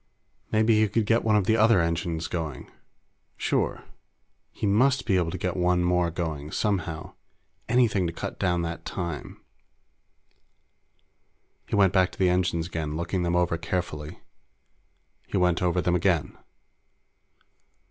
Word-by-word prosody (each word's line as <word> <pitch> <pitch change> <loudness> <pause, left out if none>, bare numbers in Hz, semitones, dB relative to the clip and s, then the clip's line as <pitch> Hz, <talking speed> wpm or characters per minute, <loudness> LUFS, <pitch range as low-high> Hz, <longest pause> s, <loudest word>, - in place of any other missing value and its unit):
Maybe 110 0 +3
he 110 - +4
could 105 +2 0
get 115 +2 +2
one 110 -1 +3
of 105 -3 +2
the 110 - +3
other 110 -2 +5
engines 85 -1 -1
going! 80 -6 -5 0.7
Sure. - - -1 0.7
He - - -4
must 130 +7 +3
be 105 -5 +2
able 85 -3 +1
to - - -4
get 90 -1 -2
one 90 -1 +2
more 90 -1 +2
going, 80 -3 -4
somehow. 85 -6 -2 0.6
Anything 110 -7 +3
to - - -3
cut - - -6
down 90 -1 +1
on 85 - -1
that 85 0 -5
time! 85 -5 -5 2.3
He - - -2
went 95 -3 +4
back 95 -1 +3
to - - -13
the 95 -1 +3
engines 90 -2 0
again, 80 -3 -4
looking 85 +2 -2
them 85 0 0
over 85 -1 +1
carefully. 80 -3 -4 1.1
He - - -2
went 90 -2 +2
over 90 0 +1
them 90 - +1
again. 90 -3 +1
90 Hz, 145 wpm, -26 LUFS, 85-100 Hz, 2.3 s, other